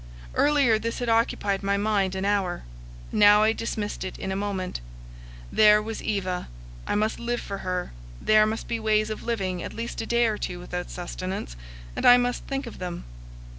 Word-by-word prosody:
Earlier, 280 -7 +4
this 230 +1 -3
had 245 -1 -2
occupied 215 -3 +1
my 200 0 +1
mind 200 -2 +1
an 190 +1 -2
hour; 200 -3 0 0.5
now 210 0 +6
I 220 +1 +4
dismissed 215 -3 -3
it 185 - -6
in 190 - -4
a - - -1
moment; 195 - -3 0.7
there 210 0 +6
was 220 +1 -5
Eva, 185 -3 -2 0.4
I - - 0
must 215 +1 0
live 240 0 -1
for 200 -1 -6
her; 180 -1 -3 0.3
there 215 0 +5
must 220 +1 -3
be 230 - -2
ways 215 0 +1
of 215 - -5
living 190 -6 -2
at - - -6
least 230 +1 -4
a 225 - -5
day 235 0 +3
or 215 -2 0
two 180 -1 -4
without 180 0 -5
sustenance, 180 - -5 0.4
and - - -3
I 245 0 +9
must 245 0 -1
think 275 0 -2
of 235 - -9
them. 180 -2 -5
210 Hz, 190 wpm, -26 LUFS, 190-225 Hz, 0.7 s, I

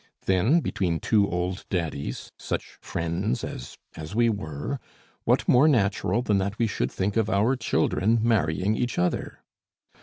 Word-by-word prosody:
"Then 105 - +3
between 85 - -1
two 105 -3 +2
old 90 +2 -2
daddies, 80 -6 -3
such - - -5
friends 85 -1 -2
as 60 - -7 0.2
as 80 +5 -7
we 120 0 +4
were, 100 - -3 0.5
what - - +2
more 130 +5 +6
natural 105 - +2
than 105 -4 +2
that 100 +2 -2
we 115 - +2
should 65 - -1
think 100 +3 -1
of 110 -1 +2
our 110 +6 +3
children 115 -2 +1
marrying 105 -3 +1
each 120 +1 -2
other? 90 0 -1
100 Hz, 150 wpm, -26 LUFS, 90-115 Hz, 0.5 s, more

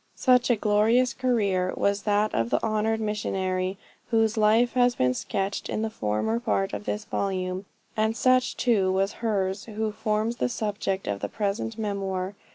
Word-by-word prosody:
Such 250 -2 +3
a 240 - +5
'glorious 220 +4 +3
career' 200 -8 0
was 200 0 +1
that 210 +1 +2
of 115 0 0
the - - +2
honored 220 0 0
missionary 190 -3 -2 0.3
whose 225 -1 +2
life 220 +3 +3
has 245 -1 +3
been 125 0 +2
sketched 195 +9 -3
in 215 - -1
the 220 - -2
former 110 - -1
part 100 -4 -1
of 105 0 -5
this 105 0 -3
volume; 185 -1 -2 0.3
and 220 +1 0
such 255 0 +2
too 205 -7 +2
was 195 +1 +1
hers 195 -4 -1
who 220 -1 -3
forms 215 +2 -1
the - - 0
subject 205 -4 -2
of 100 -1 -2
the - - -3
present 210 +2 -2
memoir. 195 -3 -2
210 Hz, 165 wpm, -26 LUFS, 185-225 Hz, 0.3 s, a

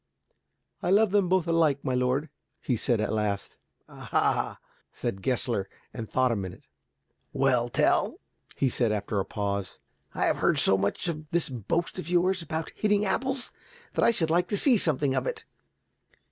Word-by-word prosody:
"I - - -1
love 205 +1 +4
them 200 -3 +2
both 185 -2 +2
alike, 160 -4 +2
my 130 - 0
lord," 125 +4 0 0.3
he 125 - -1
said 115 +1 0
at 110 0 -1
last. 105 -2 -2 0.3
"Ah," - - -1 0.3
said 95 - -4
Gessler, 120 -4 -1 0.2
and 115 -3 -6
thought 130 -1 +2
a - - +1
minute. 95 -3 -6 0.7
"Well, - - +2
Tell," - - +1 0.4
he 135 - +1
said 120 -2 +1
after 105 0 -1
a 95 - -1
pause. 100 -2 -3 0.4
"I - - +1
have - - +1
heard - - +2
so 95 - +4
much 100 - -1
of 155 -2 -4
this 170 -3 0
boast 165 - -2
of 170 - -6
yours 180 +1 +2
about 160 0 -4
hitting 210 -1 +1
apples, 260 +5 -1 0.4
that - - +1
I - - +6
should 165 -9 +1
like 175 +2 +2
to 205 - -1
see 260 +4 +5
something 150 - +3
of - - -1
it. 455 -3 -4
145 Hz, 175 wpm, -27 LUFS, 110-180 Hz, 0.7 s, I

